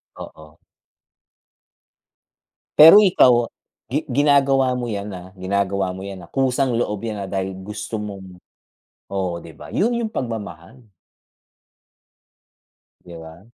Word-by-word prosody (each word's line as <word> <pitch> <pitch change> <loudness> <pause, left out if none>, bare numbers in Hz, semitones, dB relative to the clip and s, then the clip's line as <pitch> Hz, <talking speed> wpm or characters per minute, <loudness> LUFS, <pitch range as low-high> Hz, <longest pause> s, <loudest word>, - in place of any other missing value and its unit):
Oo. 80 0 -12 2.2
Pero 165 +7 +10
ikaw 125 - +4 0.4
gi 140 +5 0
ginagawa 135 -2 +3
mo 125 -1 -3
'yan, 100 -1 -4
ah, 90 +1 -11
ginagawa 95 0 -1
mo 95 - -8
'yan, 100 -1 -8
ah, - - -31
kusang 130 -1 0
loob 105 -3 -2
'yan, 105 -3 -4
ah, 95 - -7
dahil 95 -1 -3
gusto 105 +3 -7
mong 100 -3 -7 0.7
oo, 95 -3 -3
'di 80 -2 -13
ba, - - -12
'yun 235 +4 0
'yung 235 -2 -2
pagmamahal. 115 - -7 2.2
Di 85 -1 -12
ba? 80 +3 -13
105 Hz, 120 wpm, -21 LUFS, 95-130 Hz, 2.2 s, Pero